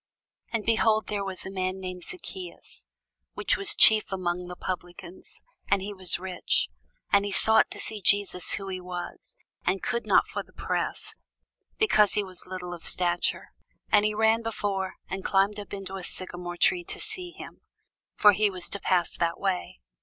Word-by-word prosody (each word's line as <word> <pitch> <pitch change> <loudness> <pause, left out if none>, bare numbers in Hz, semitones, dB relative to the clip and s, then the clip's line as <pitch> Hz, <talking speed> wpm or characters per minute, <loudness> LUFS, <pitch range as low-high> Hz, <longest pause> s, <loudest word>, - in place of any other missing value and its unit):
And 225 -3 -2
behold, 220 -1 +3
there 205 -1 -1
was 190 -2 -4
a 190 - -5
man 185 0 -2
named 185 -1 -6
Zacchæus, 365 +1 -8 0.5
which - - +2
was 400 -3 -2
the - - -10
chief 215 -2 +6
among 180 -1 -2
the 180 - -7
publicans, 180 0 -7 0.2
and 200 - +3
he 200 +2 -5
was 185 -3 +3
rich. 185 0 0 0.4
And 200 0 +5
he 205 - -3
sought 220 +3 +4
to - - -8
see 215 -2 -3
Jesus 200 -1 +2
who 195 - -4
he 185 -1 -4
was; 180 -1 -7 0.3
and 185 +1 0
could 235 - -2
not - - +5
for - - -4
the - - -18
press, - - -2 0.6
because 215 - +4
he 210 - +1
was 185 -2 -11
little 180 -1 -5
of 170 - -9
stature. 175 -1 +1 0.4
And 210 -1 +6
he 215 0 +1
ran 220 +1 +3
before, 200 -4 -2
and 190 0 -5
climbed 200 +2 +2
up 205 - -9
into 195 -1 -5
a 190 - -7
sycomore 175 -1 -1
tree 360 - +3
to - - -5
see 360 -1 -3
him: - - -11 0.5
for 210 - +7
he 210 +1 +2
was 185 -3 -2
to 200 - -3
pass 180 -3 +1
that 170 -1 0
way. 185 - -2
195 Hz, 185 wpm, -27 LUFS, 180-210 Hz, 0.6 s, for